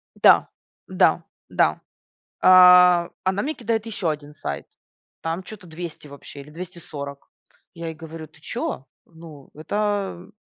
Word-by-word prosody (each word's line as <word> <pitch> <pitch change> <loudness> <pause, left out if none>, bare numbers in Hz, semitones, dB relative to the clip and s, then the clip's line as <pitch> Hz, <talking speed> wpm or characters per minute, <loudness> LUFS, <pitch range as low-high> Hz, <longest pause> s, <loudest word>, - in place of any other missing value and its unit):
Да, - - +5 0.4
да, - - +2 0.3
да. - - +1 0.6
А, 180 -1 +7
она 190 +2 0
мне 305 +3 -2
кидает 230 -1 -2
ещё 205 -6 -3
один 150 -1 -4
сайт, 70 - -6 0.6
там 165 +3 -3
чё-то 210 -2 -11
200 165 -1 -8
вообще 140 0 -11
или 145 +2 -12
240. 155 -5 -9 0.5
Я 165 0 -7
ей 160 - -6
говорю: 160 0 -9
"Ты 155 0 -23
чё? 135 -3 -4 0.2
Ну, 160 -4 -14
это, 155 +6 -7 0.4
м, 190 +4 -15
165 Hz, 140 wpm, -23 LUFS, 150-185 Hz, 0.6 s, А